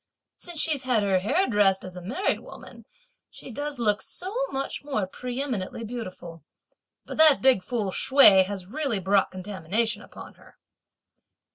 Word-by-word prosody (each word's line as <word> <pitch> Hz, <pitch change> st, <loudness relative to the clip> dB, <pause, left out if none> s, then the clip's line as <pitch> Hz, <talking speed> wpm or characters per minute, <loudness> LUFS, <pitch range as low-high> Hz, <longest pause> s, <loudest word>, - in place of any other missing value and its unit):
Since 345 Hz, -3 st, -8 dB
she's 300 Hz, -4 st, +1 dB
had 250 Hz, -5 st, +1 dB
her 195 Hz, -2 st, +2 dB
hair 275 Hz, -, +1 dB
dressed 205 Hz, -4 st, +2 dB
as 185 Hz, -1 st, -9 dB
a 180 Hz, -, -8 dB
married 245 Hz, -, -1 dB
woman -, -, -13 dB, 0.4 s
she -, -, -12 dB
does 290 Hz, +3 st, -5 dB
look 215 Hz, -3 st, +2 dB
so 375 Hz, +4 st, -3 dB
much 270 Hz, +1 st, -4 dB
more 270 Hz, -9 st, -2 dB
pre 245 Hz, +6 st, -6 dB
eminently 230 Hz, -5 st, -4 dB
beautiful! 185 Hz, -, -8 dB, 0.6 s
But -, -, -8 dB
that 315 Hz, -3 st, +6 dB
big 260 Hz, -7 st, +5 dB
fool 210 Hz, -1 st, -3 dB
Hsüeh 205 Hz, -6 st, +6 dB
has 195 Hz, -1 st, -6 dB
really 270 Hz, 0 st, -2 dB
brought 195 Hz, +1 st, +2 dB
contamination 205 Hz, +3 st, -3 dB
upon -, -, -12 dB
her." -, -, -20 dB
220 Hz, 155 wpm, -25 LUFS, 190-270 Hz, 0.6 s, that